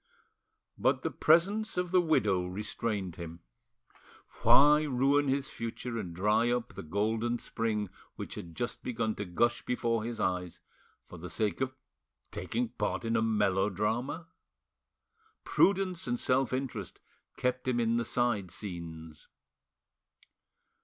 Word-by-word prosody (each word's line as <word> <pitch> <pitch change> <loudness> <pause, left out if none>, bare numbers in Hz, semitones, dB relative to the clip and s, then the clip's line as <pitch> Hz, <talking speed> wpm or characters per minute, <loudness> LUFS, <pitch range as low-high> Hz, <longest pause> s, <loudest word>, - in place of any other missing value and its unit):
But - - +2
the - - -1
presence 195 +8 +3
of 180 -1 -1
the 185 -1 +5
widow 100 - +2
restrained 100 -1 -3
him. 85 0 -8 1.0
Why 150 +2 +7
ruin 140 0 +2
his 135 0 0
future 115 +1 -4
and 90 -5 -5
dry 105 +7 +2
up 120 -4 -1
the 100 - -7
golden 110 +7 0
spring 110 -3 -2 0.3
which - - -6
had 85 -1 -8
just 120 +6 -3
begun 115 -3 -1
to 105 - -5
gush 120 +7 +1
before 115 -2 0
his 115 0 -4
eyes, 90 -2 -1 0.5
for 90 - -11
the 90 +2 -7
sake 105 +8 -1
of 130 0 -1 0.6
taking 120 0 -2
part 110 0 -2
in 115 0 +1
a 110 - +3
melodrama? 105 - 0 1.2
Prudence 190 -4 +2
and 120 0 0
self 130 0 +2
interest 130 -7 -4 0.4
kept 125 0 -1
him 125 -2 +2
in 115 0 +2
the 120 - 0
side 115 -6 0
scenes. 80 -6 -8
115 Hz, 130 wpm, -31 LUFS, 100-130 Hz, 1.2 s, Why